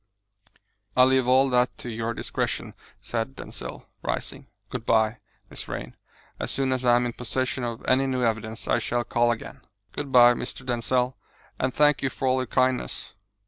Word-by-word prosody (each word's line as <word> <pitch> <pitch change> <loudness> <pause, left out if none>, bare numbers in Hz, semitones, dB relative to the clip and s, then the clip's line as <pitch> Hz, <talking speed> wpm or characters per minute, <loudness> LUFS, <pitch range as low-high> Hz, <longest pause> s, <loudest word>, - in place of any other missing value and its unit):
"I 125 - +8
leave 130 -1 +4
all 130 +2 +5
that 125 0 +2
to - - -8
your 115 0 -3
discretion," - - -2 0.3
said 120 +3 -3
Denzil, - - -8 0.2
rising. - - -4 0.2
"Good 125 -3 -4
bye, 110 -1 +2 0.3
Miss - - -5
Vrain. - - -6 0.4
As - - -3
soon 135 -1 +1
as 130 0 -2
I 120 -1 +5
am 125 0 +2
in 120 - -2
possession 130 +1 -2
of 120 -1 -4
any 135 +1 +3
new 130 -1 0
evidence 110 -1 -2
I - - +3
shall 120 0 -1
call 120 0 +2
again." 115 -1 -4 0.3
"Good 140 -2 -5
bye, 120 -1 +8
Mr. 120 +2 -6
Denzil, 125 +1 0 0.4
and 130 - +1
thank 150 +1 +4
you 135 - +1
for 130 +1 -3
all 130 0 +3
your 130 -1 -1
kindness." 130 +1 0
125 Hz, 180 wpm, -26 LUFS, 120-130 Hz, 0.4 s, I